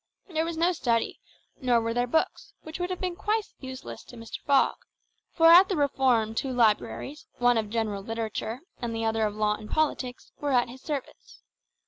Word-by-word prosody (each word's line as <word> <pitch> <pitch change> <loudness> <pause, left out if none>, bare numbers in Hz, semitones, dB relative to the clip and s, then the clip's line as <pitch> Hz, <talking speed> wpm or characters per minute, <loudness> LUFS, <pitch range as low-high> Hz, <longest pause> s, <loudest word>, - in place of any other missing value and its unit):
There 320 -3 -1
was 335 -1 -4
no 340 +2 +3
study, 235 -9 0 0.4
nor 245 -2 +3
were 230 0 -1
there 245 +1 +1
books, 320 +6 -1
which 315 +2 -7
would 355 0 -1
have 365 - -3
been 365 -2 -2
quite 425 +2 -1
useless 260 - -8
to - - -13
Mr. 230 0 -7
Fogg; 280 -1 +4 0.5
for 330 - +2
at 350 +3 +9
the 380 - 0
Reform 260 -6 +2
two 260 +3 -2
libraries, 245 +5 0
one 245 0 +4
of 220 -2 -1
general 215 -3 -1
literature 225 +2 -4 0.2
and 235 -2 -3
the 225 0 -2
other 220 -1 +1
of 210 - -6
law 210 0 +2
and 215 0 -8
politics, 265 -5 -1
were 290 -2 -1
at 245 -1 +3
his 255 +2 -11
service. 290 -4 -6
245 Hz, 190 wpm, -27 LUFS, 225-310 Hz, 0.5 s, at